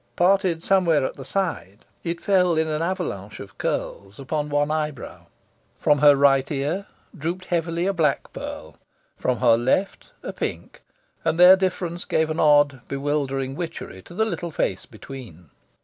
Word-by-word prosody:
Parted 180 -2 +2
somewhere 170 -8 +3
at - - -4
the 135 - -9
side, 150 - -3 0.2
it 170 0 -3
fell 180 -4 +2
in 160 0 +1
an 155 0 -2
avalanche 165 - -3
of 95 - -11
curls 100 +3 -4
upon 150 +2 -3
one 145 +1 +1
eyebrow. 150 -3 -4 0.5
From 145 -1 +2
her 145 0 +7
right 135 -1 +3
ear 150 +8 -2 0.3
drooped 175 +3 -4
heavily 170 0 -1
a 195 - +1
black 160 -5 0
pearl, - - -8 0.4
from 125 -1 -1
her 120 -2 +6
left 130 - -1
a - - -5
pink; - - -5 0.4
and 165 - 0
their 180 +1 +10
difference 180 -2 -2
gave 160 0 0
an 155 - -3
odd, 145 -3 +4
bewildering 135 -1 -2
witchery 165 - -6
to 175 - -14
the 220 +3 +2
little 175 -4 -4
face 95 - -2
between. 110 - -11
155 Hz, 160 wpm, -23 LUFS, 135-175 Hz, 0.5 s, their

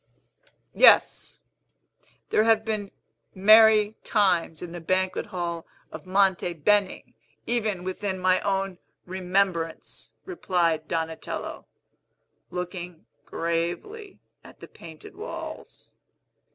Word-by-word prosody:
"Yes; - - +4 0.9
there 215 - +4
have 220 -1 +3
been 210 -3 -3 0.5
merry 215 +1 +6
times 180 -7 +1
in 175 - -7
the 175 0 -7
banquet 185 +2 -1
hall 170 -2 -4 0.2
of - - -10
Monte 190 -2 +2
Beni, 195 +5 0 0.3
even 215 -6 -1
within 190 +1 -3
my 185 0 +2
own 195 -2 -2 0.3
remembrance," 180 -2 -2
replied 170 - -1
Donatello, 160 -1 -4 0.8
looking 180 -2 -6 0.2
gravely 175 - -4 0.2
at - - -16
the - - -11
painted 160 -2 -13
walls. 435 +5 -9
185 Hz, 95 wpm, -25 LUFS, 170-210 Hz, 0.9 s, merry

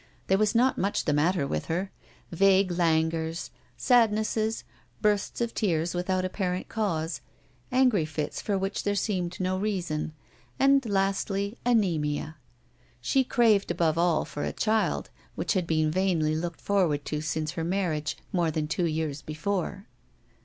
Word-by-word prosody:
There 190 - +3
was 215 +1 +2
not 255 +3 +3
much 200 +2 0
the 150 - +2
matter 155 +1 +2
with 75 - -2
her 185 +4 -2 0.4
vague 190 +1 +4
languors, 165 -1 0 0.3
sadnesses, 220 - +2 0.4
bursts 210 +1 0
of 235 -1 -1
tears 170 -5 0
without 185 +1 0
apparent 185 -1 -2
cause, 165 -7 -2 0.5
angry 250 -9 +3
fits 155 -1 -4
for 200 -2 0
which 195 +1 -2
there 205 0 0
seemed 185 -4 -2
no 185 +1 -1
season, 170 -7 -2 0.4
and 275 0 +4
lastly 195 +1 0
anæmia. 160 -10 +1 0.7
She 265 - +2
craved 225 -5 +3
above 160 -2 +1
all 170 -2 +2
for 145 - -5
a - - -1
child, 220 0 0 0.2
which - - -1
had 185 -4 0
been 155 -1 +2
vainly 165 -4 +1
looked 170 +1 -4
forward 175 -8 +1
to 150 -1 -2
since 155 0 -2
her 165 - -4
marriage, 165 -5 -1 0.2
more 175 -3 +2
than 155 -1 -2
two 170 +2 0
years 155 -2 -2
before. 185 +5 -3
180 Hz, 145 wpm, -27 LUFS, 160-205 Hz, 0.7 s, vague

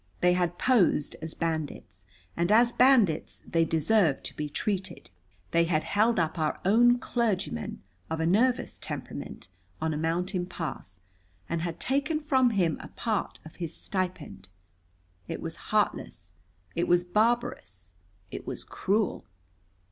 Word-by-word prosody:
They 180 0 +5
had 175 -1 0
posed 215 - +3
as 160 0 -6
bandits, 150 - -4 0.3
and 170 +3 +1
as 235 +2 +6
bandits 240 - +3
they 165 -1 +2
deserved 165 0 +2
to - - -6
be 150 -1 -3
treated. 190 - -3 0.4
They 170 0 +4
had 155 -2 +1
held 220 +3 +2
up 165 -1 0
our 155 -1 0
own 240 +5 +5
clergyman, 215 - -2 0.3
of 160 - -2
a 160 - +1
nervous 245 +8 +2
temperament, - - -7 0.3
on 160 0 -1
a - - -2
mountain 175 +3 -1
pass, 150 - -6 0.5
and 170 -1 -2
had 170 -1 -4
taken 285 +4 0
from 265 -5 +3
him 180 -8 +1
a - - -8
part 220 -4 -3
of 160 - -13
his 170 -2 -4
stipend. 175 - -4 0.8
It - - -4
was - - -5
heartless. - - -1 0.4
It 170 - 0
was 175 0 +4
barbarous. 210 - -1 0.4
It - - -7
was - - -4
cruel. 205 - -1
180 Hz, 140 wpm, -28 LUFS, 160-225 Hz, 0.8 s, as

